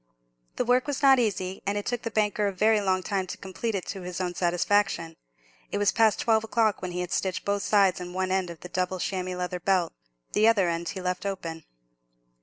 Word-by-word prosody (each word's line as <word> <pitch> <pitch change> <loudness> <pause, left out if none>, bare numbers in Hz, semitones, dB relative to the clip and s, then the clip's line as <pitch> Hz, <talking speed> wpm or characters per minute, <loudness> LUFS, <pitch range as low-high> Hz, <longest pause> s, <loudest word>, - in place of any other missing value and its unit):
The - - -1
work 250 +3 +3
was 285 -1 -3
not 270 -2 +7
easy, 190 -5 -1
and 200 +1 0
it 205 - -3
took 245 -1 -2
the 230 - -3
banker 210 -1 +1
a - - 0
very 215 +3 +3
long 185 -2 +1
time 190 0 -1
to - - -6
complete 200 +4 -4
it 190 - -3
to 195 - -5
his 180 0 -5
own 180 -1 -2
satisfaction. 175 -1 +1 0.6
It - - -1
was 205 0 +3
past 220 -2 +3
twelve 220 -1 +3
o'clock 225 -1 +1
when 185 - -3
he 180 0 -3
had 180 -1 -5
stitched 190 -2 -1
both 200 0 0
sides 195 -4 +3
and 180 0 -6
one 185 0 -1
end 190 -2 0
of 170 -2 -10
the 180 - -9
double 185 +1 -1
chamois 185 0 -2
leather 180 0 -3
belt; 180 -1 +1 0.4
the 215 +1 +4
other 205 -5 +4
end 170 0 -2
he 190 - -5
left 180 0 -2
open. 165 -5 -5
190 Hz, 225 wpm, -27 LUFS, 180-210 Hz, 0.6 s, not